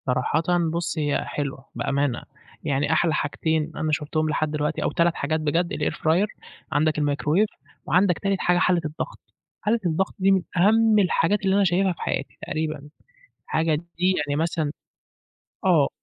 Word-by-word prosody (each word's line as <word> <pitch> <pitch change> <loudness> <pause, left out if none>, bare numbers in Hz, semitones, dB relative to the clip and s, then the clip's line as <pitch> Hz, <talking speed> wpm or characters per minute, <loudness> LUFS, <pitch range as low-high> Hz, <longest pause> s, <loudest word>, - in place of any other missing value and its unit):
صراحةً 130 +5 +1 0.3
بُصّ، 170 0 -2
هي 145 -2 0
حلوة 135 -2 -4
بأمانة، 140 -3 0 0.4
يعني 145 +1 +1
أحلى 160 0 +2
حاجتين 160 +1 -1
أنا 155 0 -1
شُفتهم 155 +1 0
لحد 155 0 0
دلوقتي 150 0 -1
أو - - 0
3 170 0 +2
حاجات 155 +3 -1
بجد 165 +3 0
الair 150 - -1
fryer 170 +6 +2 0.4
عندك 155 +1 +1
الmicrowave 150 +6 +2 0.4
وعندك 180 +3 +3
تالت 195 -1 0
حاجة 180 0 +2
حلّة 180 -1 +3
الضغط، 155 +1 -5 0.4
حلّة 225 +3 +1
الضغط 175 +3 0
دي 195 +1 +4
من 190 -1 +4 0.2
أهم 215 +4 +5
الحاجات 190 +1 +2
اللي 190 0 +3
أنا 200 - +4
شايفها 185 0 +2
في 165 - -14
حياتي 135 - -3
تقريبًا، 155 -2 -3 0.6
حاجة 160 -1 +1
دي 175 +3 -1
يعني 145 - -1
مثلًا 165 -3 -1 0.9
آه. - - +4
160 Hz, 155 wpm, -24 LUFS, 150-180 Hz, 0.9 s, أهم